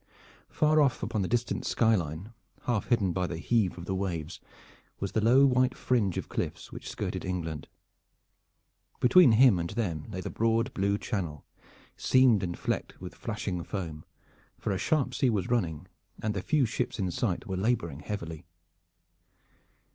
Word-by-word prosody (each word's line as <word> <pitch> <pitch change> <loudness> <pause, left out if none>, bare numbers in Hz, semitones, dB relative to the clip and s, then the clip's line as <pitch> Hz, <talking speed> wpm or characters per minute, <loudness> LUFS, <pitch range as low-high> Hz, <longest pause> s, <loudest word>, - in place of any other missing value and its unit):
Far 155 0 +3
off 140 -4 +1
upon 110 - -1
the 95 - 0
distant 120 +2 -1
sky 115 -1 +3
line, 90 +3 -3 0.3
half 120 -4 -1
hidden 110 -7 +2
by 90 0 0
the 85 - -4
heave 100 0 +1
of 85 - -7
the 95 - -2
waves, 90 -4 -3 0.6
was 100 - -3
the 110 - +1
low 130 +5 +6
white 130 -1 +2
fringe 110 -8 +1
of - - -3
cliffs - - -4
which - - -8
skirted - - -4
England. 80 -5 -4 1.3
Between 125 0 +7
him 115 -5 +6
and 85 0 -2
them 85 -10 -2
lay 95 - -5
the - - -5
broad 115 +3 +1
blue 100 +1 +1
Channel, 85 - -4 0.5
seamed 130 -6 +4
and 85 -2 -3
flecked - - -3
with 90 -1 -8
flashing 105 -6 -4
foam, 80 -6 -5 0.5
for - - -3
a 95 - -1
sharp 155 -4 +1
sea 130 - +2
was 105 -2 -1
running 90 -7 -1 0.3
and 110 -1 -1
the 100 - -2
few 150 +2 +2
ships 120 +2 -2
in 95 -4 -1
sight 95 0 -1
were 95 -4 -3
laboring 95 - -1
heavily. 85 -2 -6
100 Hz, 165 wpm, -29 LUFS, 90-120 Hz, 1.3 s, Between